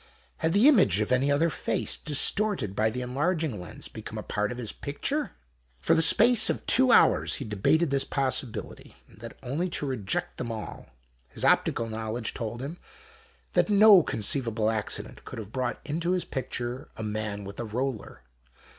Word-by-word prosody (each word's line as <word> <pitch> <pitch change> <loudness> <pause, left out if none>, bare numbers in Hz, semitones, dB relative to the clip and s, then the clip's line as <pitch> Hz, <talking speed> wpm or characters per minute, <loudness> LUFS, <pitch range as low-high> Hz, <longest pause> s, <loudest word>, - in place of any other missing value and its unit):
Had 160 +1 -1
the 210 +7 +5
image 185 - +5
of 105 - -1
any 130 +3 +2
other 160 +4 +2
face, - - -1
distorted 150 - +2
by 110 +1 +2
the 125 +3 -4
enlarging 145 - -2
lens, 90 - -8
become - - -9
a - - -5
part 105 0 -2
of 125 - -6
this 120 -4 -4
picture? 280 - -4 0.5
For 120 - +2
the 165 - +4
space 225 +7 +6
of - - -3
two 255 0 +3
hours - - +4
he 135 - -6
debated 125 - +1
this 135 -1 +2
possibility, 135 -4 -3
and 95 - -20
that, 115 +1 -10
only 150 +9 -2
to 165 - -2
reject 120 -8 -3
them 120 -2 -4
all. 110 -2 -8 0.4
His 65 - -5
optical 115 - +2
knowledge 110 +1 -4
told 120 +2 -5
him 160 +6 -7 0.7
that - - +2
no 205 -2 +7
conceivable 115 -3 0
accident 110 -2 -4
could - - -9
have 110 -2 -8
brought 130 0 -3
into 165 +4 -1
his 180 -2 -1
picture 125 +1 -5
a 110 - -5
man 105 -1 -4
with 100 0 -9
a - - -2
roller. 115 - -5
130 Hz, 175 wpm, -27 LUFS, 110-165 Hz, 0.7 s, no